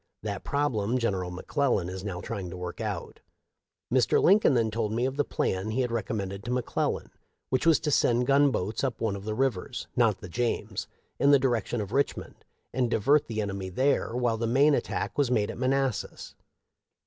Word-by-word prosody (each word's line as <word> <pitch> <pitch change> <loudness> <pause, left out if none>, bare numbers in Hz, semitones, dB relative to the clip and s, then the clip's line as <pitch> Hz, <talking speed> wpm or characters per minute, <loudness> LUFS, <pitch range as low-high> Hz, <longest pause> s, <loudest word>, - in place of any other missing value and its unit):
That 100 -3 -4
problem 130 -6 0
Gen 115 -4 +1
eral 90 -1 -3
McClellan 105 - 0
is 95 +1 -6
now 95 -4 -4
trying 100 -5 -5
to 90 - -7
work 90 -1 -6
out.' - - -4 0.7
Mr. 130 -2 +4
Lincoln 195 -6 +5
then 115 -2 +2
told 110 -1 -1
me 120 +3 0
of 135 +1 -2
the 145 - +2
plan 95 -5 -2
he 120 +4 0
had 125 -2 -1
recom 115 0 -2
mended 100 -1 -4
to 120 - -6
McClellan, 125 -1 -1 0.4
which 130 +5 +1
was 165 - +6
to 150 - -1
send 125 -2 +3
gunboats 135 -7 +2
up 130 -4 -1
one 110 -3 -1
of 100 0 -8
the 110 0 -2
rivers 125 -2 -1
— - - -42
not 115 -6 +3
the 95 - -9
James 115 +8 -2 0.2
— - - -44
in 140 - +4
the 140 -1 +7
direc 120 -6 0
tion 120 - -2
of 100 -1 -6
Richmond, 140 +3 -2 0.3
and 125 -2 +1
divert 140 +7 +3
the 110 -2 -2
enemy 100 -2 -4
there 130 +6 +1
Mobile 120 -2 0
the 115 +1 -1
main 140 +6 +4
attack 140 - -2
was 140 -4 +3
made 105 -5 +1
at - - -9
Manassas. 135 -2 -1
115 Hz, 205 wpm, -28 LUFS, 100-130 Hz, 0.7 s, the